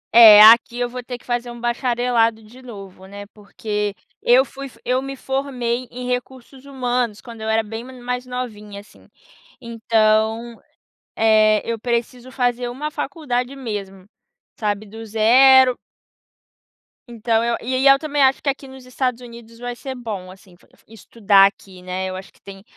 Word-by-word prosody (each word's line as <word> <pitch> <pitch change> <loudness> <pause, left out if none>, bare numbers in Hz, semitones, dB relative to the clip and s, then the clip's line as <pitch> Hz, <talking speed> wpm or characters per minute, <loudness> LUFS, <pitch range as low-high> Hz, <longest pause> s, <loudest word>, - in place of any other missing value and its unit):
É, 215 -3 +10
aqui 235 +3 +6
eu 245 - 0
vou 250 +1 -7
ter 245 0 -7
que - - -24
fazer 240 0 -3
um 240 0 -10
bacharelado 240 -2 0
de 235 +5 -16
novo, 195 -6 -12
né, 200 +1 -10
porque 210 0 -5 0.3
eu 255 +2 +4
fui 275 0 -9 0.2
eu 255 +1 0
me 275 0 -7
formei 255 -3 -3
em 250 0 -8
recursos 255 +1 -6
humanos, 245 -5 -2
quando 230 -2 -12
eu 220 - -4
era 220 0 +1
bem 225 +2 -7
mai 255 0 -12
mais 250 0 -4
novinha 210 -5 -7
assim, 205 - -22 0.5
então, 225 -1 0 0.5
eh, 215 -1 +3
eu 230 - -2
preciso 240 +2 -4
fazer 245 -1 -1
uma 280 +5 -5
faculdade 275 -4 -4
mesmo, 200 -6 -7 0.5
sabe, 210 -1 -3
do 225 +2 -10
0 255 +4 +5 1.3
então 230 -1 -1
eu 235 0 -1
e 255 +2 -3
aí 260 +1 0
eu 275 0 +6
também 295 -1 -2
acho 265 0 +2
que 285 - -1
aqui 275 0 -4
nos 265 -1 -13
Estados 255 -1 -3
Unidos 235 -2 -13
vai 245 0 -6
ser 265 +2 -7
bom 210 -7 -7
assim, 185 -1 -18
fo - - -26
f - - -27
estudar 205 -2 +3
aqui, 190 -2 -11
né. 185 +1 -4
Eu 185 - -6
acho 190 +1 -10
que - - -29
tem 195 -1 -12
235 Hz, 170 wpm, -20 LUFS, 215-250 Hz, 1.3 s, É